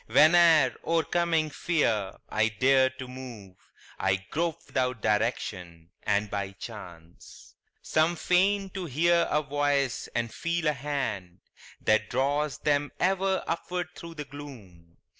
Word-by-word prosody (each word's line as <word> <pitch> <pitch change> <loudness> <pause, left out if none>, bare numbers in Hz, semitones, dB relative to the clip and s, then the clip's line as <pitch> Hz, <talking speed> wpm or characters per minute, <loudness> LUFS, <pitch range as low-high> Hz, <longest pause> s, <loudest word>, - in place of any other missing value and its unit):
Whene'er, 155 +1 +6
o'ercoming 165 -1 +1
fear, 115 - 0
I 110 0 +1
dare 130 +4 +3
to 130 -1 -9
move, 120 -7 -10 0.4
I 95 0 +2 0.2
grope 165 0 -1
without 125 -3 -1
direction 95 -6 -2
and 100 +1 +1
by 100 -1 -4
chance. 90 -6 -11 0.3
Some 160 +2 +2
feign 190 +4 +2
to 190 -2 -5
hear 170 +4 +2
a 150 +1 +1
voice 145 -2 0
and 115 -1 -1
feel 170 0 -2
a 150 - +3
hand 120 -11 -4 0.4
That 110 0 +2
draws 140 +3 0
them 145 -1 0
ever 190 +1 +1
upward 175 +1 -3
thro' 170 -1 -10
the 150 -2 -6
gloom. 110 -13 -12
140 Hz, 125 wpm, -28 LUFS, 110-165 Hz, 0.4 s, Whene'er